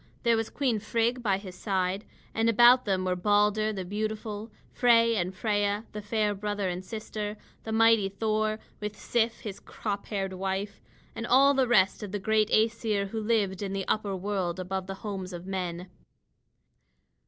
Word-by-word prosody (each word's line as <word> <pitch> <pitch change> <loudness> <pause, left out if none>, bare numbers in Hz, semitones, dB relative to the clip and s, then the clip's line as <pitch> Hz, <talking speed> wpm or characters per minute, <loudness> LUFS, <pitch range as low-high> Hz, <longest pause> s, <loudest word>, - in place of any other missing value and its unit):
There 235 -1 +4
was 225 0 -1
Queen 255 -6 0
Frigg 230 +3 0
by 200 -5 +1
his 190 -2 -9
side; 190 +1 -1 0.3
and 225 +1 +2
about 240 +3 +6
them 190 -3 0
were 180 0 +1
Balder 210 +3 +2
the 190 -3 -4
beautiful, 215 +2 -4 0.2
Frey 230 -2 +4
and 180 -2 -1
Freia, 205 +1 0
the 210 - -6
fair 210 0 0
brother 205 -1 -2
and 180 0 -3
sister; 215 0 -5 0.3
the 220 - -4
mighty 225 -2 +4
Thor, 215 +1 0 0.2
with 210 0 -5
Sif, 230 -1 0
his 210 -4 -6
crop 205 -2 -5
haired 195 -2 -2
wife, 190 +2 -3 0.3
and 230 +1 -4
all 275 +2 +6
the 265 -2 +2
rest 195 -5 +3
of 205 -3 -6
the 205 - -1
great 215 +2 +2
Æsir 215 -2 +1
who 220 +2 -3
lived 210 -4 0
in 195 -1 -3
the 195 -1 -3
upper 205 -2 0
world 190 -2 -2
above 185 +1 -3
the 195 - -4
homes 190 -3 -4
of 175 0 -7
men. 180 -2 -4
210 Hz, 175 wpm, -28 LUFS, 195-225 Hz, 0.3 s, about